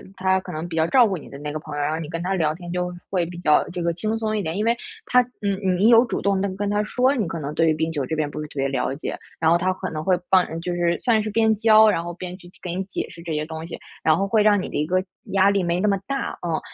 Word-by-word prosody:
他 190 Hz, 0 st, +2 dB
可 -, -, -9 dB
能 160 Hz, +3 st, -4 dB
比 165 Hz, -, -5 dB
较 160 Hz, 0 st, +2 dB
照 250 Hz, +1 st, +6 dB
顾 190 Hz, -3 st, -2 dB
你 -, -, -11 dB
的 140 Hz, -, -9 dB
那 150 Hz, +1 st, -5 dB
个 155 Hz, -, -4 dB
朋 150 Hz, -1 st, -8 dB
友， 145 Hz, -, -2 dB
然 150 Hz, -, 0 dB
后 160 Hz, -, -2 dB
你 155 Hz, -, -5 dB
跟 165 Hz, +1 st, -4 dB
他 190 Hz, +1 st, -1 dB
聊 155 Hz, -4 st, +1 dB
天 175 Hz, 0 st, -8 dB
就 180 Hz, 0 st, -2 dB, 0.2 s
会 180 Hz, -3 st, 0 dB
比 175 Hz, +1 st, -8 dB
较 150 Hz, -3 st, +3 dB
这 175 Hz, -1 st, -4 dB
个 170 Hz, 0 st, +1 dB
轻 215 Hz, +6 st, -2 dB
松 215 Hz, -1 st, -1 dB
一 -, -, 0 dB
点。 165 Hz, +2 st, -3 dB
因 210 Hz, -, 0 dB
为 235 Hz, +1 st, +3 dB, 0.3 s
他 250 Hz, 0 st, +5 dB, 0.2 s
嗯， 200 Hz, -1 st, -1 dB
你 190 Hz, -, +1 dB, 0.2 s
你 -, -, +7 dB
有 235 Hz, +1 st, +7 dB
主 -, -, -3 dB
动 200 Hz, -1 st, +1 dB
地 200 Hz, -, +1 dB
跟 205 Hz, 0 st, -2 dB
他 205 Hz, 0 st, +1 dB
说， 255 Hz, +5 st, +2 dB
你 215 Hz, -8 st, -1 dB
可 165 Hz, 0 st, -4 dB
能 145 Hz, 0 st, -4 dB
对 165 Hz, +1 st, +2 dB
于 -, -, +3 dB
冰 160 Hz, +1 st, -1 dB
球 145 Hz, -4 st, -2 dB
这 160 Hz, -, -3 dB
边 155 Hz, -2 st, -1 dB
不 150 Hz, -, -6 dB
是 150 Hz, -, -5 dB
特 -, -, -16 dB
别 135 Hz, 0 st, +1 dB
了 135 Hz, 0 st, -1 dB
解， 155 Hz, -, -5 dB, 0.2 s
然 160 Hz, 0 st, +3 dB
后 170 Hz, -, +5 dB
他 185 Hz, +1 st, 0 dB
可 185 Hz, 0 st, -5 dB
能 155 Hz, 0 st, -4 dB
会 185 Hz, -2 st, +3 dB
帮 185 Hz, -1 st, +5 dB
就 180 Hz, 0 st, -3 dB
是 175 Hz, -1 st, +1 dB
算 225 Hz, -3 st, +3 dB
是 215 Hz, -, -3 dB
边 220 Hz, +1 st, +3 dB
教， 220 Hz, 0 st, +6 dB
然 165 Hz, -4 st, 0 dB
后 175 Hz, 0 st, -5 dB
边 180 Hz, +1 st, -7 dB
去 175 Hz, -2 st, -15 dB
给 175 Hz, -1 st, -4 dB
你 190 Hz, +1 st, -2 dB
解 190 Hz, -, -4 dB
释 170 Hz, -, -12 dB
这 165 Hz, -2 st, -4 dB
些 150 Hz, 0 st, -1 dB
东 160 Hz, +1 st, -7 dB
西， -, -, -7 dB, 0.3 s
然 155 Hz, 0 st, +4 dB
后 195 Hz, -, 0 dB
会 215 Hz, +1 st, +3 dB
让 205 Hz, -2 st, +4 dB
你 -, -, -5 dB
的 -, -, -8 dB
一 150 Hz, -, +1 dB
个 185 Hz, +1 st, +1 dB, 0.2 s
压 195 Hz, 0 st, +3 dB
力 200 Hz, -1 st, +2 dB
没 170 Hz, +1 st, 0 dB
那 210 Hz, -, +2 dB
么 195 Hz, -, +2 dB
大， 275 Hz, -1 st, -3 dB
嗯。 160 Hz, -1 st, 0 dB
180 Hz, 350 characters per minute, -23 LUFS, 160-200 Hz, 0.3 s, 你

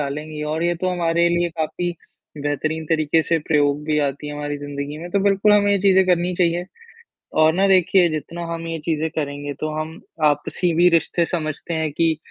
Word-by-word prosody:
डालेंगे 150 Hz, +2 st, -4 dB
और 160 Hz, -, -2 dB
ये 175 Hz, 0 st, +1 dB
तो 185 Hz, +2 st, -2 dB
हमारे 170 Hz, -1 st, +2 dB
लिए 175 Hz, 0 st, +1 dB
काफ़ी 175 Hz, +3 st, -2 dB, 0.5 s
बेहतरीन 155 Hz, +2 st, -2 dB
तरीके 160 Hz, 0 st, +2 dB
से 165 Hz, +1 st, +1 dB
प्रयोग 145 Hz, -1 st, +2 dB
भी 150 Hz, 0 st, +1 dB
आती 145 Hz, 0 st, -2 dB
है, 145 Hz, -, -5 dB
हमारी 145 Hz, 0 st, -4 dB
ज़िंदगी 145 Hz, +1 st, -6 dB
में 175 Hz, +2 st, -8 dB
तो 200 Hz, -, +1 dB
बिल्कुल 200 Hz, +1 st, +3 dB
हमें 205 Hz, -1 st, +4 dB
ये 200 Hz, -, +3 dB
चीज़ें 190 Hz, -1 st, +5 dB
करनी 180 Hz, 0 st, +2 dB
चाहिए। 175 Hz, 0 st, +1 dB, 0.8 s
और 155 Hz, 0 st, +5 dB
ना 195 Hz, +2 st, +3 dB
देखिए 185 Hz, -1 st, +5 dB
जितना 160 Hz, +2 st, -5 dB
हम 165 Hz, 0 st, -5 dB
ये 165 Hz, 0 st, -3 dB
चीज़ें 160 Hz, -1 st, -1 dB
करेंगे 145 Hz, -2 st, -4 dB
तो 155 Hz, -, -2 dB
हम 160 Hz, +1 st, -7 dB, 0.2 s
आपसी 150 Hz, +4 st, +1 dB
भी 175 Hz, +2 st, +5 dB
रिश्ते 170 Hz, 0 st, +1 dB
समझते 160 Hz, 0 st, -4 dB
हैं 160 Hz, -1 st, -1 dB
कि 160 Hz, +1 st, +1 dB
160 Hz, 195 wpm, -21 LUFS, 150-175 Hz, 0.8 s, चीज़ें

